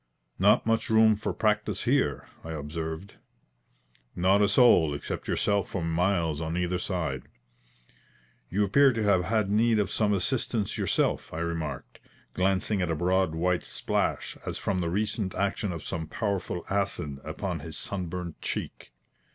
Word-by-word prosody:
"Not - - +4
much 115 0 +1
room 110 -1 +5
for 105 - -3
practice 105 -2 0
here?" 120 - +1 0.2
I 80 - -6
observed. 80 +4 -5 1.0
"Not 95 +3 +3
a 100 - +4
soul 100 - +5
except 70 - -5
yourself 100 -2 +1
for 95 - -3
miles 85 -2 0
on 80 +1 -2
either 90 0 0
side." 80 -9 -3 1.2
"You 100 +4 +1
appear 140 +5 +5
to 115 -1 -1
have 95 -4 +3
had 110 -3 +1
need 110 +2 +3
of 100 -2 0
some 105 -2 +1
assistance 105 +1 0
yourself," - - 0
I - - -6
remarked, 80 -5 -4 0.3
glancing 95 +2 +1
at 90 - 0
a 80 - 0
broad 90 0 +1
white 90 +2 +1
splash, - - -2
as - - -4
from 95 -2 -1
the 85 - -1
recent 105 +1 -1
action 100 +1 -1
of 85 -2 -6
some 80 -1 -3
powerful 95 -2 -3
acid, 85 -8 -2
upon - - -4
his - - -7
sunburnt 90 -3 -5
cheek. - - -5
95 Hz, 150 wpm, -28 LUFS, 85-105 Hz, 1.2 s, room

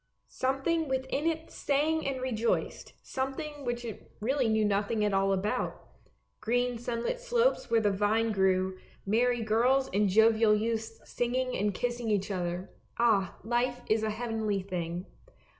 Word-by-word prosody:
Some 270 +1 -1
thing 330 -1 +1
within 265 +3 -1
it 320 -1 -2
sang 305 +3 0
and 270 -1 -2
rejoiced, 235 -3 -1
something 285 +2 -4
which 240 0 -2
it 220 -4 -8
really 255 +2 +1
knew 220 -1 +2
nothing 205 +1 +1
at 205 - 0
all 195 0 +2
about; 195 +2 -1 0.6
green 245 +1 0
sunlit 240 - -2
slopes - - +1
where 230 -1 +3
the 205 -1 +2
vine 195 - -4
THE 205 - +3
BOTTLE 220 +2 +2
NECK - - 0
85 - - -2 0.3
grew, 190 0 -6 0.3
merry 240 +4 +2
girls 250 +5 +2
and 205 0 +3
jovial 220 +1 +5
youths 225 +1 -2
singing 255 +1 -1
and 205 +1 +1
kissing 240 +3 -2
each 205 -1 0
other. 180 0 -3 0.3
Ah, 215 -6 +2
life 245 +2 0
is 220 0 +3
a 220 - 0
heavenly 220 -3 -2
thing 175 -1 -4
230 Hz, 165 wpm, -30 LUFS, 210-260 Hz, 0.6 s, jovial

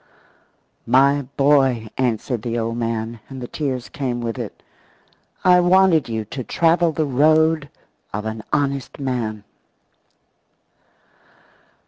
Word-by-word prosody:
"My 140 +4 +4 0.2
boy," 135 -5 +3
answered 125 -1 -1
the 120 +1 -3
old 115 0 -2
man, 115 0 -3
and 135 -1 -8
the 125 - -6
tears 130 -4 -3
came 130 -4 -3
with 115 -2 -4
it, - - -7 0.8
"I 180 -1 +6
wanted 180 -5 +4
you 110 -1 -3
to 130 +5 -6
travel 165 +4 +2
the 155 0 -1
road 155 +2 +3 0.4
of 105 +1 -4
an 110 0 -5
honest 140 -3 -1
man." 120 -6 -3
130 Hz, 115 wpm, -21 LUFS, 115-150 Hz, 0.8 s, I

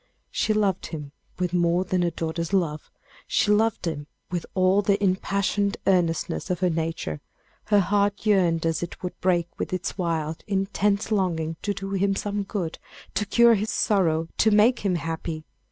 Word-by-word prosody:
She - - 0
loved 205 -4 +1
him 150 -4 -7 0.3
with 180 -1 -1
more 175 0 +2
than 185 -1 0
a 175 - +2
daughter's 165 +1 -3
love; 160 -6 0 0.4
she 210 - +2
loved 220 -1 +2
him 150 -3 -3 0.2
with 175 -2 -3
all 185 +1 +4
the 200 0 +2
impassioned 200 +1 +1
earnestness 175 -2 +1
of 180 -1 -1
her 180 -1 +3
nature; 160 - -3 0.4
her 205 -1 +4
heart 200 +2 +1
yearned 175 -6 +3
as 165 -1 0
it 175 +2 -6
would 180 - -5
break 175 -2 +2
with - - -3
its 185 +1 -3
wild, 160 -3 -2
intense 200 +1 0
longing 165 -6 0
to 205 -1 -2
do 195 0 -5
him 195 0 +1
some 205 +1 -2
good, 190 -4 -4 0.3
to 205 +1 -1
cure 235 +2 +6
his 215 0 0
sorrow, 165 -6 +1
to 220 - +5
make 215 +4 +4
him 195 -3 0
happy. 160 0 -4
185 Hz, 170 wpm, -25 LUFS, 165-200 Hz, 0.4 s, cure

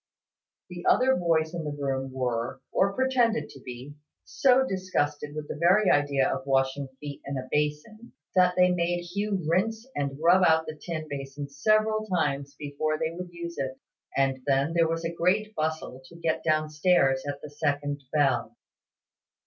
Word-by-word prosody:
The 175 -1 -7
other 260 +1 +4
boys 165 -2 +1
in 170 -2 -3
the 145 -1 -4
room 135 -1 -2
were, 125 -1 -2
or 195 +1 +2
pretended 245 -2 +1
to 135 - -13
be, 125 +3 -8 0.3
so 265 0 +3
disgusted 150 - -2
with 155 -1 -5
the - - -5
very 180 +6 +4
idea 145 -2 +2
of 130 - -3
washing 135 +1 +1
feet 145 -1 -7
in 140 0 -4
a 130 0 -5
basin, 150 +11 -2 0.2
that 180 -1 +4
they 180 0 +5
made 175 0 0
Hugh 195 0 -2
rinse 220 +7 0
and 140 -1 -2
rub 175 +4 +5
out 160 -1 +4
the 155 - -5
tin 155 0 -5
basin 140 0 -6
several 215 +8 +2
times 140 -7 -1
before 150 +1 -2
they 160 0 -1
would 180 +1 -7
use 170 0 -7
it, 130 -1 -3 0.4
and 135 -1 +1
then 140 +3 +2
there 165 -1 +3
was 165 0 -2
a 165 - -2
great 200 +6 +1
bustle 155 -6 -3
to 170 - -15
get 165 -1 -1
down 155 -1 +1
stairs 150 -4 +3
at 140 0 -3
the 150 - -8
second 145 0 -1
bell. 140 -4 +1
155 Hz, 175 wpm, -27 LUFS, 140-180 Hz, 0.4 s, they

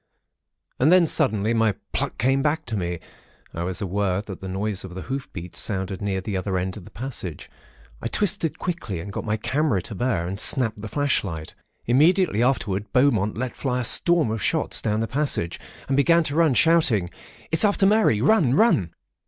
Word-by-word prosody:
"And 145 +6 +4
then, 180 -1 +6
suddenly, 115 -9 +1
my 110 -3 +2 0.2
pluck - - -2
came 135 +3 +2
back 155 +2 0
to 115 - -3
me. 90 -3 -3 0.5
I 85 - -5
was 90 +3 -3
aware 100 -1 -1
that 95 -4 -9
the 95 - -6
noise 100 +1 -3
of 90 -2 -9
the 95 - -6
hoof 135 +1 -5
beats 85 -1 -6
sounded 95 -1 -3
near 95 -2 -2
the 100 +1 -4
other 95 0 -2
end 90 +1 -3
of 100 - -10
the - - -12
passage. 110 - -6 0.5
I - - -2
twisted 195 -5 0
quickly, 165 - -4
and 100 +4 -7
got - - -5
my 110 0 -1
camera 140 -1 0
to - - -7
bear, 100 -4 -1
and 95 +2 -5
snapped 115 -4 +3
the 110 - -6
flashlight. 100 - -2 0.3
Immediately 155 - +3
afterwards, 105 -6 0
Beaumont 115 -7 +2
let 125 +1 -4
fly 125 -2 -2
a - - -3
storm 165 +1 +3
of 110 -1 -3
shots - - 0
down 110 0 -1
the 115 - -1
passage, 135 - 0 0.3
and 135 - 0
began 165 +4 +4
to 150 -2 -3
run, 160 -5 +3
shouting:—'It's 160 - +1
after 205 -2 +3
Mary. 205 - +3
Run! 145 - +3
Run!' 110 - +2
115 Hz, 190 wpm, -23 LUFS, 95-145 Hz, 0.5 s, then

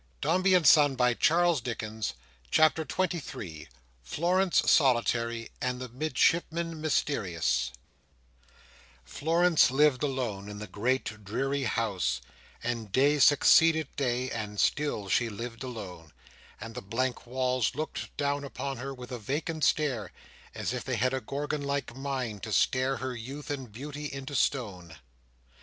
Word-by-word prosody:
You - - -1
have 180 - +3
a 195 - +4
good 180 -3 +4
scent, 145 -2 +6
Di,—cats, 155 +6 +3
boy, 115 0 -3
cats! 110 - -4 0.3
CHAPTER 155 - +4
XXIII. 135 - -3 0.3
Florence 175 - +1
solitary, 120 -4 +2
and 125 0 -1
the 125 -1 -6
Midshipman 160 +5 0
mysterious 85 - 0 1.3
Florence 165 - +3
lived 140 0 +3
alone 120 -8 -2
in 105 - -7
the 105 - -6
great 110 -1 -2
dreary 135 +7 -1
house, 100 - 0 0.4
and 115 -3 -3
day 145 +6 +3
succeeded 160 +2 +5
day, 130 -1 -1
and 105 -2 -4
still 145 -9 0
she 115 +4 +2
lived 115 +2 -7
alone; 95 - -8 0.5
and 115 0 -8
the - - -6
blank 120 +5 -2
walls 130 -1 0
looked 155 +2 -5
down 145 0 0
upon 140 -1 -5
her 135 +2 -5
with 125 -1 -10
a 125 - -4
vacant 150 +7 -3
stare, 130 -11 +1 0.4
as - - -2
if - - -3
they - - -2
had 130 +1 +1
a 130 - -1
Gorgon 145 +2 -3
like 140 -3 -3
mind 130 -6 -3
to 110 - -6
stare 130 +5 +2
her 130 -1 -4
youth 135 +6 -7
and 135 -5 -5
beauty 145 +5 -6
into 135 +1 -7
stone. 95 - -1
130 Hz, 145 wpm, -29 LUFS, 115-145 Hz, 1.3 s, scent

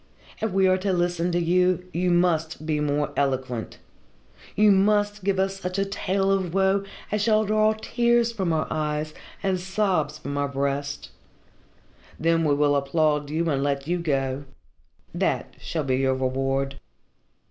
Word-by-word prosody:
If 220 - 0
we 190 0 +3
are 185 0 +3
to 195 +1 0
listen 175 0 0
to 175 - +1
you, 180 +1 +2
you 180 +2 0
must 165 -3 +1
be 155 -1 0
more 150 0 0
eloquent. 130 -4 -2 0.8
You 210 +1 +5
must 205 +1 +2
give 195 0 +1
us 195 0 0
such 185 0 -4
a 195 - +1
tale 195 0 0
of 190 -3 0
woe 195 +1 +3 0.3
as 210 0 0
shall 215 0 +3
draw 215 +1 +3
tears 235 0 +2
from 190 -7 -1
our 155 -1 +1
eyes 155 0 -2 0.3
and 190 -2 +1
sobs 185 -5 0
from 140 -2 -6
our 145 - +1
breasts 140 +1 -3 1.1
then 165 +1 +2
we 145 -2 +3
will 145 0 +3
applaud 150 +1 +1
you 165 +3 -1
and 135 -1 0
let 140 -1 -1
you 175 +1 0
go. 135 -3 -1 0.7
That - - -1
shall 160 -2 -3
be 130 -2 0
your 130 0 +1
reward." 135 +1 -1
170 Hz, 160 wpm, -25 LUFS, 145-195 Hz, 1.1 s, You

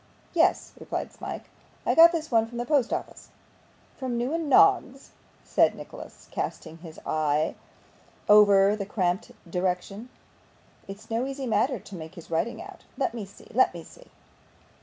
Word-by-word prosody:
'Yes,' 335 -1 +2
replied - - -5
Smike, - - -7 0.4
'I - - +2
got 335 +1 +8
this 320 -3 -4
one 225 -1 +3
from 240 +1 -9
the 240 - -2
post 275 -3 +2
office.' - - -5 0.7
'From 255 -3 -3
Newman 295 +6 -2
Noggs,' 280 -4 +4 0.3
said - - +2
Nicholas, - - -11
casting 165 - -5
his 160 -2 -11
eye 155 0 0 0.7
upon 205 -1 +6
the 200 -2 -5
cramped 180 -3 -1 0.2
direction; 180 +6 -3 0.8
'it's 195 +3 -10
no 235 +4 0
easy 275 0 -5
matter 240 +3 +1
to 200 0 -11
make 160 +1 -9
his 170 - -12
writing 165 +8 -1
out. 390 -1 -13
Let 265 -4 -1
me 225 -4 -5
see 200 - -17
let 255 -6 +3
me 170 - -7
see. - - -16
225 Hz, 155 wpm, -26 LUFS, 185-265 Hz, 0.8 s, got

